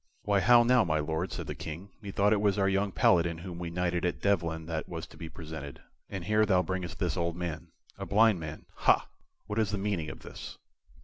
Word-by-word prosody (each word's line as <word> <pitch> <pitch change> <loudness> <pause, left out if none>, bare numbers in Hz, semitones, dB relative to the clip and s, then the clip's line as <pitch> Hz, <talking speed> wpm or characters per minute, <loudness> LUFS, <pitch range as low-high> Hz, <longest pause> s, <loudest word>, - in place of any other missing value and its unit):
"Why, 100 -1 +3
how 120 +5 +7
now, 125 0 +5
my 80 -5 +1
Lord?" 80 +4 -2
said - - -4
the - - -4
King. 85 +5 -7
"Methought 100 0 +2
it 105 - +1
was 100 -2 +2
our 95 -1 +3
young 100 +1 +1
Paladin 85 -2 +3
whom 85 0 -7
we 85 -1 -4
knighted 90 0 -1
at 90 - 0
Devlen 85 -5 0
that 80 -1 -4
was 80 -2 -5
to - - -16
be 80 -2 -7
presented, 80 -4 -8 0.3
and 95 -3 -5
here 105 +2 +3
thou 95 -4 +3
bringest 90 -4 -4
this 90 -2 -1
old 85 -2 -1
man. 85 -2 -4 0.3
A - - -5
blind 110 -2 +4
man, 80 -1 -7
ha! - - +3 0.4
What 105 +2 -2
is 110 -2 +2
the 105 - -1
meaning 95 -6 -2
of - - -9
this?" - - -9
90 Hz, 225 wpm, -30 LUFS, 80-100 Hz, 0.4 s, how